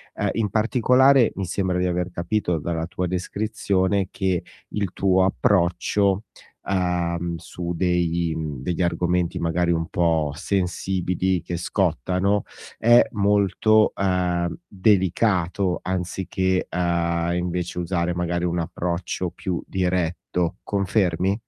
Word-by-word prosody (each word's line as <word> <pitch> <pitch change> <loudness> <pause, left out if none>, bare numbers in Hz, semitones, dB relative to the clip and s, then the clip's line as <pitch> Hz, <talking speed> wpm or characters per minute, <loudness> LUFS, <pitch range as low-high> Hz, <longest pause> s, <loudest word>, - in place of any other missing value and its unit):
Ehm, - - 0
in 110 -3 0
particolare, 125 +3 +4
mi 95 - -3
sembra 90 0 -1
di 90 - +1
aver 90 +1 -1
capito 85 -1 -1
dalla 80 +1 -2
tua 90 +1 -3
descrizione 95 0 -1
che 95 -3 -1 0.3
il 100 -4 -2
tuo 95 -1 +3
approccio, 95 +2 +1 0.5
ehm, 85 -2 0
su 85 +2 -6
dei 85 -1 +1
degli 80 +2 -3
argomenti 90 0 0
magari 85 +1 +1
un 80 -1 0
po' 80 -4 +1
sensibili, 95 0 -1
che 85 - -5
scottano, 95 +4 0 0.3
è 120 +1 +5
molto, 105 +1 +3
ehm, 90 -3 0
delicato 95 -2 +1
anziché, 95 0 -1
ehm, 85 -1 0
invece 90 0 -2
usare 85 0 -1
magari 85 0 -1
un 85 0 0
approccio 85 +2 -3
più 90 0 -4
diretto. 90 -2 -1
Confermi? 95 -2 +1
90 Hz, 110 wpm, -23 LUFS, 85-95 Hz, 0.5 s, è